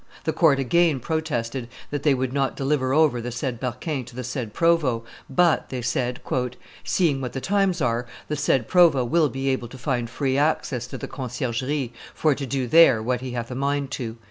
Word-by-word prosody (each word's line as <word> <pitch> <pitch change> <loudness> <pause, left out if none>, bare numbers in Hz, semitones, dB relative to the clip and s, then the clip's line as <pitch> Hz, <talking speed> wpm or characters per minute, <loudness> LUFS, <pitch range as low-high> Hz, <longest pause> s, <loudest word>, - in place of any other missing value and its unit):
The 160 - 0
court 155 -3 +4
again 155 +2 +2
protested 130 -5 -2 0.2
that 145 -1 -2
they 145 -2 +3
would 130 0 -2
not 135 -1 0
deliver 135 -1 0
over 145 -4 +3
the 120 - -4
said 120 0 -3
Berquin 130 +3 -3
to 125 0 -13
the 125 - -4
said 125 -2 -4
provost; 145 -6 +2 0.2
but, 170 +4 +2
they 125 -2 -4
said, 125 +1 -1 0.6
"seeing 155 -7 +1
what 125 -2 -4
the 135 - -3
times 195 +1 +1
are, 120 -1 0 0.2
the 150 - -2
said 135 -5 +1
provost 160 -9 +4
will 165 -3 +4
be 135 +1 -2
able 130 -2 -1
to 130 - -11
find 120 -2 -2
free 135 +2 0
access 140 -5 0
to - - -7
the - - -6
Conciergerie, 130 +1 -3 0.2
for 155 -2 +3
to 140 0 -5
do 130 0 -1
there 135 -3 +6
what 125 +1 -1
he 130 -1 -5
hath 120 0 -4
a - - -3
mind 140 +1 -1
to." 120 -4 -4
135 Hz, 200 wpm, -24 LUFS, 125-150 Hz, 0.6 s, there